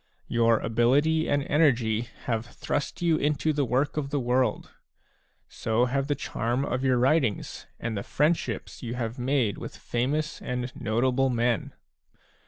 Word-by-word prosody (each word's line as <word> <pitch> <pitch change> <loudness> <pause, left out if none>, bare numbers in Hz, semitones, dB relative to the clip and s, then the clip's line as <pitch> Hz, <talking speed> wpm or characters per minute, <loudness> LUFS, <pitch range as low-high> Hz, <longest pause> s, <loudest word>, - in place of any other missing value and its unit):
Your 115 -1 +3
ability 140 +9 +2
and 145 -1 +2
energy 120 -7 +2
have 115 0 -2
thrust 145 +6 -3
you 165 -2 +3
into 150 +1 +1
the 145 -1 +1
work 130 +6 0
of 140 -2 -1
the 145 - 0
world; 125 -2 0 0.8
so 115 +2 0
have 135 +2 -1
the 145 - +1
charm 120 +3 -2
of 130 -1 -2
your 130 -2 +3
writings 130 -3 +1
and 115 -1 -3
the 100 - -2
friendships 150 +10 -1
you 120 -1 -4
have 120 0 -4
made 125 -5 +1
with - - -8
famous 145 +6 -2
and 125 0 -4
notable 125 +4 +1
men. 120 -2 0
125 Hz, 150 wpm, -27 LUFS, 120-145 Hz, 0.8 s, Your